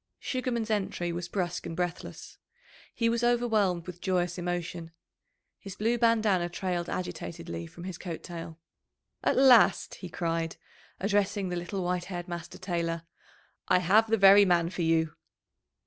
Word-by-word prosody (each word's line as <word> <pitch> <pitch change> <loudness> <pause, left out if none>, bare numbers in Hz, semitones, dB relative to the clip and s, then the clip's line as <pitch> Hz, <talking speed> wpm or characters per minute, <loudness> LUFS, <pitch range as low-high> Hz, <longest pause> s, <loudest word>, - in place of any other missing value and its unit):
Sugarman's 240 -4 -2
entry 190 -4 -1
was 170 0 -4
brusque 180 -3 -2
and 165 - -5
breathless. 175 -1 -5 0.6
He 230 - +1
was 230 +1 +1
overwhelmed 220 -8 +2
with 180 -1 -9
joyous 180 -1 0
emotion. 175 -1 -3 0.7
His 195 -1 -9
blue 230 +3 0
bandanna 215 -7 +3
trailed 175 -1 -3
agitatedly 165 - -5
from 170 - -12
his 185 -2 -6
coat 170 -4 -6
tail. 165 -2 -7 0.7
"At - - +2
last!" 255 -4 +6
he 185 - -8
cried, 165 -1 -2 0.4
addressing 200 -1 0
the 180 - -2
little 175 +2 -3
white 180 0 -1
haired 175 -2 -6
master 170 -1 -7
tailor, 170 -3 -2 0.6
"I - - +5
have 205 +5 +4
the 225 - +3
very 200 0 +8
man 175 -3 +2
for 180 - -4
you." 160 -1 +2
180 Hz, 150 wpm, -29 LUFS, 170-205 Hz, 0.7 s, very